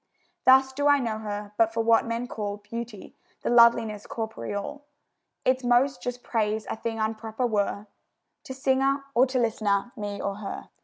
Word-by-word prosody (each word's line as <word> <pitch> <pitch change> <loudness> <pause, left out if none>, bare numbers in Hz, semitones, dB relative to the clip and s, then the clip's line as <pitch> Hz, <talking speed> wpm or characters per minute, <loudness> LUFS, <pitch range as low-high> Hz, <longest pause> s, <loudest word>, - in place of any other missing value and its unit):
Thus 265 0 +6
do 285 +2 0
I 285 0 +6
know 230 -5 -2
her: 205 -1 -5
but 225 -1 +4
for 225 0 -1
what 230 0 +4
men 230 +1 -2
call 210 -4 -4
Beauty 225 0 -8 0.3
the - - 0
loveliness 235 -3 +4
corporeal, 220 - -5 0.6
Its 255 0 +2
most 250 +2 +2
just 245 0 -5
praise 215 -1 -1
a - - -2
thing 225 0 -4
unproper 220 +2 -2
were 205 -1 -1 0.6
To 260 - -6
singer 270 +1 +1
or 255 +2 +5
to 255 0 -2
listener, 220 -2 0
me 205 -1 -5
or 200 0 -3
her. 210 -1 -7
230 Hz, 165 wpm, -26 LUFS, 210-250 Hz, 0.6 s, Thus